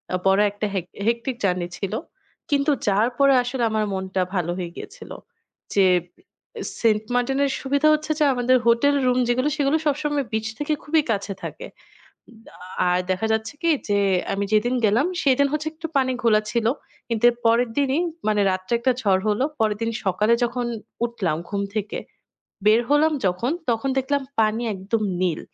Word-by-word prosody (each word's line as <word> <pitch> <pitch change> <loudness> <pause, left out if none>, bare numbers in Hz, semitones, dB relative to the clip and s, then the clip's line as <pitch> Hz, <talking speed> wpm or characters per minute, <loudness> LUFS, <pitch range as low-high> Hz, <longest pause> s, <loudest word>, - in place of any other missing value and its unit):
আ - - +2
বড় 195 +1 +4
একটা 205 +1 -4
হেক 180 -2 -1 0.2
hectic 235 +2 0
journey 180 -2 0
ছিল। 195 -2 -4 0.6
কিন্তু 285 +1 +2 0.2
যাওয়ার 210 +5 +2
পরে 275 -1 +6
আসলে 250 0 -2
আমার 215 -1 +1
মনটা 190 0 -2
ভালো 175 -1 0
হয়ে 175 -2 -4
গিয়েছিল। - - -10 0.6
যে, 195 -2 +5 1.0
সেন্ট 215 -2 +3
মার্টিনের 270 +3 +1
সুবিধা 280 +3 +2
হচ্ছে 305 0 -1
যে, - - +4
আমাদের 250 +1 +3
হোটেল 240 +5 +4
রুম 250 0 +2
যেগুলো, 255 +4 +1
সেগুলো 285 +1 +2
সবসময় 295 -1 0
বিচ 220 0 -1
থেকে 295 +1 0
খুবই 310 +1 +2
কাছে 200 -1 -2
থাকে। - - -6 0.6
উ - - -16 0.2
আ - - -18 0.3
আর 180 0 +2
দেখা 205 +4 -1
যাচ্ছে 220 +2 -2
কি? 335 - +3 0.2
যে, 205 - +3 0.4
আমি 200 +1 -1
যেদিন 240 +4 +2
গেলাম, 220 +7 +3 0.2
সেদিন 280 0 +4
হচ্ছে 305 +1 -2
একটু 325 +1 -6
পানি 260 -1 +2
ঘোলা 215 -2 +4
ছিল। 235 -1 0 0.4
কিন্তু 230 -1 -2
এর - - -11
পরের 230 +1 +3
দিনই, 280 +2 +2 0.3
মানে 210 -1 +2
রাত্রে 185 +4 -3
একটা 255 +2 +2
ঝড় 195 -5 +2
হলো। 210 +5 +1 0.2
পরের 215 -2 +1
দিন 230 0 0
সকালে 210 +4 +2
যখন 245 +1 -1 0.4
উঠলাম 195 -10 -2
ঘুম 200 -1 -2
থেকে, 210 -1 -2 0.7
বের 215 +2 +6
হলাম 305 +2 +4
যখন, 190 +9 0 0.2
তখন 230 +3 -1
দেখলাম 280 +1 0 0.2
পানি 220 +2 +1
একদম 200 +4 -2 0.2
নীল। 175 -4 0
230 Hz, 170 wpm, -23 LUFS, 205-270 Hz, 1.0 s, পরে